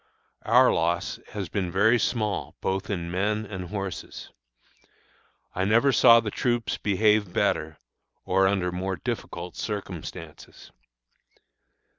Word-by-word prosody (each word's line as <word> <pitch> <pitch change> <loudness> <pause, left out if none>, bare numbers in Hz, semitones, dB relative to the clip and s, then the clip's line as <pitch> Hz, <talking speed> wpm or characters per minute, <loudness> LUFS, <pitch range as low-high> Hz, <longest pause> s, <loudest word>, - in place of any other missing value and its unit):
Our - - +5
loss 85 +1 -1
has 100 -3 -4
been 90 +1 -3
very 110 +6 +4
small 110 -4 -2
both 95 0 -2
in 85 -4 -3
men 105 +4 -1
and 95 -3 -6
horses. 95 -6 -6 1.2
I 95 - -1
never 115 +7 +4
saw 115 -1 +7
the 110 -2 -4
troops 120 0 -1
behave 105 -1 +2
better, 80 -2 0 0.5
or 95 +1 +3
under 95 -2 0
more 95 +2 -3
difficult 90 -5 -5
circumstances. 100 -6 -7
95 Hz, 115 wpm, -26 LUFS, 90-110 Hz, 1.2 s, saw